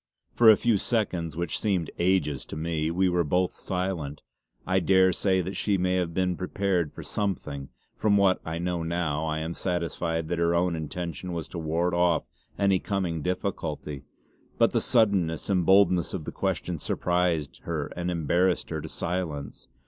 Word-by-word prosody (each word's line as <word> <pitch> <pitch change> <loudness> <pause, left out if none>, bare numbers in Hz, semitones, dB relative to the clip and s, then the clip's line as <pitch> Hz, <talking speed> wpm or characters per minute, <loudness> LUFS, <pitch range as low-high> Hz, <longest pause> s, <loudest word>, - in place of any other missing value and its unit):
For 115 -2 +7
a 110 - +8
few 115 -4 +2
seconds, 90 - -1
which 85 -2 -2
seemed 95 -6 0
ages 85 -6 +1
to - - -8
me, 80 0 -1
we 90 +3 +2
were 90 -1 +2
both 90 +4 +1
silent. 90 -6 -3 0.4
I 95 +1 +2
daresay 95 +1 +3
that 95 +3 -5
she 100 -2 +1
may 90 0 +1
have 90 -2 -1
been 90 +1 0
prepared 90 -3 -1
for - - -9
something; 85 -9 -3 0.3
from 105 -1 +3
what 95 -2 +3
I 80 0 -4
know 85 0 -2
now 80 -2 -1
I 80 0 -1
am 80 +2 -3
satisfied 85 -2 -2
that 85 -1 -1
her 85 0 +2
own 85 0 +2
intention 85 +3 -5
was 85 -2 -4
to 85 - -5
ward 85 +3 0
off 85 -1 +2 0.3
any 100 -2 +3
coming 90 -5 -2
difficulty. 80 -5 -3 0.6
But - - +4
the - - +1
suddenness 100 -8 +2
and 90 -3 +1
boldness 95 -3 +4
of 80 -5 -5
the - - -4
question 85 -3 -2
surprised 90 -3 0
her 80 -4 -3
and 90 0 -2
embarrassed 90 +2 +1
her - - -2
to - - -7
silence. 80 -6 -4
90 Hz, 170 wpm, -27 LUFS, 80-95 Hz, 0.6 s, a